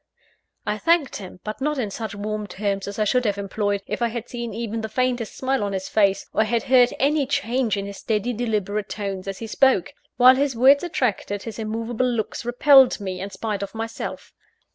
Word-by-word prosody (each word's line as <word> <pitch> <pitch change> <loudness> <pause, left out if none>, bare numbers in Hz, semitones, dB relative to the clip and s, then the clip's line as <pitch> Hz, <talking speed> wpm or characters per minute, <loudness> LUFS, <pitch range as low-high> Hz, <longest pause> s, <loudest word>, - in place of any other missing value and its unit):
I 210 0 -2
thanked 330 0 +2
him 185 -2 -10
but 215 +4 -6
not 300 +1 0
in 220 -6 -2
such 220 -1 -5
warm 210 +1 -4
terms 200 -1 -2
as 200 - -6
I 215 - +2
should 250 +4 +2
have 205 -3 0
employed, 200 0 -2
if - - -4
I 235 - +3
had 235 0 -5
seen 235 -2 -5
even 225 +1 -4
the 220 - -4
faintest 250 -1 -1
smile 265 -3 0
on 200 -1 -2
his 190 -1 -3
face, 200 -2 +2
or - - +3
had 230 +1 0
heard 255 -2 +5
any 285 +1 +2
change 255 -5 0
in 200 - -3
his 200 0 -7
steady, 220 +2 -1
deliberate 210 -3 -2
tones, 195 -2 -4
as 195 -1 -4
he 230 - -6
spoke. 255 -3 +2 0.2
While 255 +1 +7
his 275 -2 0
words 270 +6 +6
attracted, 225 - -1
his 225 -1 -7
immovable 225 +3 -1
looks 230 -1 -3
repelled 260 +2 +5
me, 190 -2 -5
in 195 - -4
spite 200 +1 -4
of 200 +2 -6
myself. 225 0 -6
225 Hz, 210 wpm, -23 LUFS, 205-250 Hz, 0.2 s, While